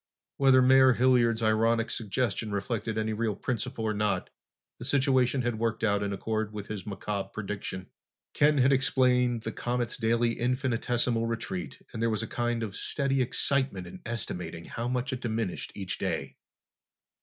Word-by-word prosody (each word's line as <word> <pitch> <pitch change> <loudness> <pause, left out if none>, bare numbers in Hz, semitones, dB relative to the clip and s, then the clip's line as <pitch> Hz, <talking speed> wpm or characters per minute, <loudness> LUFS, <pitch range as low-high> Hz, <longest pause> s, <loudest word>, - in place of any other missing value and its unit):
Whether 135 -2 +6
Mayor 130 0 +7
Hilliard's 120 -2 +3
ironic 115 +1 +2
suggestion 110 0 -1
reflected 110 +2 -2
any 110 0 0
real 110 -1 -1
principle 120 -2 -3
or 110 - +1
not, 105 0 -1 0.5
the - - -7
situation 130 -2 +2
had 120 -2 -1
worked 115 -1 -1
out 100 -2 +2
in 100 0 -1
accord 110 +2 -2
with 105 -2 -6
his 105 -3 -5
macabre 100 -1 -3
prediction. 100 -3 -5 0.5
Ken 150 0 +4
had 135 +1 +5
explained 125 -3 +2
the 110 - -3
comet's 120 +1 -2
daily 115 0 +2
infinitesimal 120 -1 0
retreat 115 -6 -4
and 110 - -4
there 115 - +2
was 110 0 -1
a - - -4
kind 120 -1 -1
of 105 -3 -5
steady 135 -2 0
excitement 130 -5 +1
in 85 - -10
estimating 90 -7 -5
how 115 +1 -4
much 125 +2 -1
it 130 - -4
diminished 110 -5 -2
each 95 -3 -4
day. - - -2
115 Hz, 160 wpm, -29 LUFS, 105-125 Hz, 0.5 s, Mayor